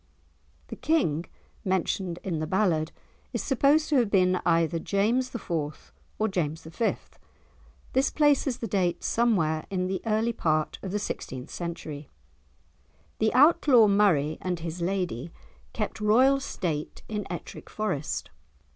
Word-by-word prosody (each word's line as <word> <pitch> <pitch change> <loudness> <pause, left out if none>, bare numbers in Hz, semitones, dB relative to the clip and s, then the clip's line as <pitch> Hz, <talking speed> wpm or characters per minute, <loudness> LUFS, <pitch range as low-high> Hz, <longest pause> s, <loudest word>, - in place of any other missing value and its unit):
The - - -5
King 175 - +1 0.4
mentioned 185 -2 -1
in 170 -5 -2
the 155 - -2
ballad 170 -4 +1 0.4
is - - -2
supposed 290 +3 +3
to 295 - +3
have 235 -5 +3
been 185 -2 +3
either 165 0 +2
James 230 +9 0
IV. 160 -9 -4 0.2
or 220 - +1
James 165 -5 -2
V. 165 +8 -1 1.0
This 265 +2 +3
places 285 -4 +2
the 230 - -4
date 180 -4 0
somewhere 170 -10 +1
in 185 -2 -1
the 190 +1 -2
early 225 +2 +1
part 155 -6 0
of 190 - -5
the 205 - 0
sixteenth 130 -10 -5
century. 155 -4 -6 1.1
The 220 0 +2
Outlaw 285 -5 +6
Murray 175 -7 +3
and 180 -2 -2
his 170 +1 -5
lady 175 -6 -2 0.4
kept 220 0 -4
royal 255 +6 +5
state 165 - -4
in 210 -2 -4
Ettrick 175 - -7
Forest. 150 -9 -3
190 Hz, 135 wpm, -27 LUFS, 165-225 Hz, 1.1 s, Outlaw